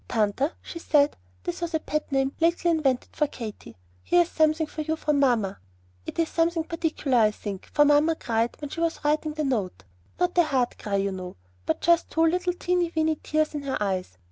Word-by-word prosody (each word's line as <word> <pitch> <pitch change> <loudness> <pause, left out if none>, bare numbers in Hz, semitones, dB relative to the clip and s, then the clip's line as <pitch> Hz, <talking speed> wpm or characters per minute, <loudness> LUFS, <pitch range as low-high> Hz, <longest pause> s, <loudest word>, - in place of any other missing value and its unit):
"Tanta," 230 - +1
she 335 - -7
said, 295 -3 +3 0.3
this 175 - -4
was 340 -1 -2
a - - +2
pet 305 -1 -3
name 270 0 +1
lately 340 +1 +2
invented 275 -6 +1
for 300 - +2
Katy, 220 - -8 0.2
"here 350 0 +4
is 340 - -11
something 315 0 +2
for 310 +1 -6
you 315 +1 -1
from 300 -2 0
mamma. 235 -8 +1 0.5
It's 330 -1 0
something 330 0 +1
quite - - -25
particular, 315 -6 0
I 215 -1 +5
think, 205 -2 -7
for 295 -1 +5
mamma 295 +3 +4
cried 230 -4 -1
when 290 -1 -6
she - - -5
was 330 -2 -1
writing 305 +1 +1
the 310 - -1
note; 210 - -2 0.4
not 360 0 +1
a - - +7
hard 260 -5 0
cry, 205 -3 -2
you 195 0 0
know, 185 -1 -7 0.3
but 160 - 0
just 340 -1 +3
two 325 0 +2
little 360 +2 +1
teeny 355 -1 0
weeny 315 -1 +1
tears 310 0 0
in 295 - -3
her 275 -1 -2
eyes. 185 - -2
300 Hz, 210 wpm, -26 LUFS, 240-325 Hz, 0.5 s, a